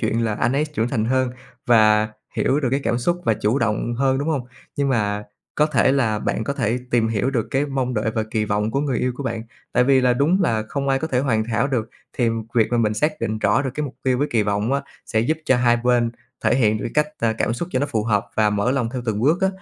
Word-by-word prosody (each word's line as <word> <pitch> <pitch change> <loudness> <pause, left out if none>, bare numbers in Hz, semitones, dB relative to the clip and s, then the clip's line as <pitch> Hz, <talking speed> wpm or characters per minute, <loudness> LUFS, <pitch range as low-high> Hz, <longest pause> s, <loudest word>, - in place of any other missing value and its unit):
chuyện 115 +1 0
là 110 -2 0
anh 120 - 0
ấy 145 +3 +1
trưởng 145 -7 -2
thành 115 -4 -1
hơn 130 +1 +1 0.4
và 110 -2 +5 0.3
hiểu 140 +3 +2
được 130 - 0
cái 135 - +1
cảm 120 - 0
xúc 175 +8 0
và 110 - +3
chủ 110 +7 0
động 115 +1 -1
hơn, 135 +1 +1
đúng 145 +3 -2
hông? 140 -6 -1 0.3
Nhưng 140 -1 +1
mà 105 -5 0 0.3
có 150 - +3
thể 130 -4 +3
là 115 -6 +1
bạn 110 - -2
có 140 - -1
thể 120 -3 -1
tìm 115 -2 +2
hiểu 115 +4 0
được 115 -5 -1
cái 135 +2 +1
mong 130 -3 -2
đợi 110 0 0
và 110 -1 -1
kỳ 110 -1 0
vọng 105 +1 0
của 140 - 0
người 140 -4 -1
yêu 125 0 0
của 140 - -5
bạn. 115 -3 -3 0.3
Tại 125 - +3
vì 135 0 +4
là 125 -1 +3
đúng 160 +10 +2
là 110 -10 +1
không 140 -1 -2
ai 135 0 +2
có 160 - -3
thể 125 - 0
hoàn 115 -5 +1
hảo 120 +3 0
được, 120 -5 -1 0.2
thì 120 -2 +1 0.3
việc 115 -2 +4
mà 120 - +1
mình 110 -2 +1
xác 150 +7 -1
định 110 0 -2
rõ 105 +5 +2
được 130 - -2
cái 150 - -2
mục 135 - -7
tiêu 130 -1 +1
với 145 - +1
kỳ 115 -2 +2
vọng 105 +4 0
á 140 - +1 0.3
sẽ 110 - +1
giúp 155 +7 0
cho 130 - +3
hai 120 -1 +3
bên 120 -1 +2 0.3
thể - - +4
hiện 110 -4 +2
được - - -5
cái 150 - +4
cách, 150 - -18
a, 115 -1 +1
cảm 110 - -1
xúc 165 +9 -4
cho - - +1
nó 145 - 0
phù 110 -5 -1
hợp 105 -3 +1
và 105 -1 +3
mở 105 +4 +1
lòng 130 -4 0
theo 125 -2 -4
từng 110 -1 -1
bước 155 +9 +2
á, 190 - +4
120 Hz, 280 wpm, -22 LUFS, 110-135 Hz, 0.4 s, và